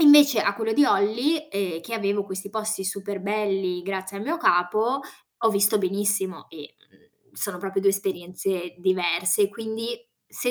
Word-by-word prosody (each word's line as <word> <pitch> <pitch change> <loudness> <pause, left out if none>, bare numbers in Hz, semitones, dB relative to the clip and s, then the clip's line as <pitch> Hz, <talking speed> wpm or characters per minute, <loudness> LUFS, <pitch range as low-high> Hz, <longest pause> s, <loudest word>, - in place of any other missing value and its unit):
invece 290 -5 +8
a 200 - +1
quello 220 +1 -1
di 290 +6 +5
Olly, 255 +11 +1
ehm, 185 -5 -2
che 230 - -5
avevo 200 -2 0
questi 190 0 -6
posti 215 -2 -2
super 195 0 -4
belli, 195 -3 -1
grazie 190 +1 -4
al - - -5
mio 330 +5 -1
capo, 215 - +2 0.4
ho 225 - +3
visto 205 +1 +3
benissimo 195 0 -1
e, 150 -3 -11 0.2
mhmm, - - -32
sono 200 -3 -4
proprio 195 +1 -2
2 195 - +5
esperienze 185 -2 -3
diverse. 180 +1 +2
Quindi 225 +2 -5 0.3
se 245 - -2
200 Hz, 160 wpm, -25 LUFS, 190-220 Hz, 0.4 s, invece